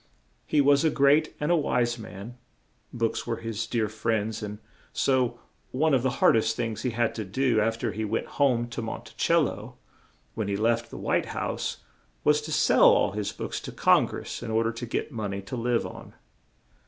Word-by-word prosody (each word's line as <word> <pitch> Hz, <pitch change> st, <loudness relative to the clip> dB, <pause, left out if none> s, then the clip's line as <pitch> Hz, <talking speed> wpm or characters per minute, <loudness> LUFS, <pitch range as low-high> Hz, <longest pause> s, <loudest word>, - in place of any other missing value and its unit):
He 150 Hz, -, +3 dB
was 140 Hz, +1 st, +4 dB
a 160 Hz, -, +4 dB
great 145 Hz, +2 st, +3 dB
and 150 Hz, +3 st, 0 dB
a -, -, +5 dB
wise 120 Hz, -6 st, 0 dB
man; 110 Hz, +3 st, -9 dB, 0.5 s
books 115 Hz, -2 st, -2 dB
were -, -, 0 dB
his 115 Hz, 0 st, -4 dB
dear 115 Hz, -2 st, 0 dB
friends; 110 Hz, 0 st, -2 dB
and 105 Hz, 0 st, -5 dB, 0.4 s
so 125 Hz, -3 st, +1 dB, 0.3 s
one 155 Hz, +4 st, +1 dB
of 130 Hz, -, +4 dB
the 130 Hz, -, +1 dB
hard -, -, +5 dB
est 110 Hz, -, +1 dB
things 115 Hz, -2 st, -3 dB
he 125 Hz, -, 0 dB
had 115 Hz, 0 st, 0 dB
to 110 Hz, -, -4 dB
do, 115 Hz, +3 st, +1 dB
af 115 Hz, +1 st, 0 dB
ter 115 Hz, -1 st, -2 dB
he 110 Hz, -, -4 dB
went 110 Hz, +1 st, -1 dB, 0.2 s
home 120 Hz, -4 st, +3 dB
to 120 Hz, 0 st, -5 dB
Mon 110 Hz, -, -5 dB
ti -, -, -14 dB
cel 170 Hz, 0 st, +3 dB
lo, 115 Hz, 0 st, -5 dB, 0.6 s
when 110 Hz, -3 st, -3 dB
he 100 Hz, 0 st, -1 dB
left 115 Hz, +2 st, +1 dB
the -, -, -9 dB
White -, -, 0 dB
House, -, -, -3 dB, 0.4 s
was 150 Hz, 0 st, +3 dB
to 155 Hz, +1 st, -7 dB
sell 150 Hz, -, +4 dB
all -, -, +5 dB
his 105 Hz, 0 st, -3 dB
books -, -, -5 dB
to -, -, -7 dB
Con -, -, +4 dB
gress -, -, -6 dB
in 120 Hz, -, -5 dB
or 110 Hz, +1 st, +2 dB
der 115 Hz, -, 0 dB
to 115 Hz, +1 st, -6 dB
get 120 Hz, -, -3 dB
mon 105 Hz, -5 st, -3 dB
ey 100 Hz, -, -4 dB
to 115 Hz, +7 st, -7 dB
live 120 Hz, 0 st, 0 dB
on. -, -, -10 dB
115 Hz, 215 wpm, -27 LUFS, 110-130 Hz, 0.6 s, a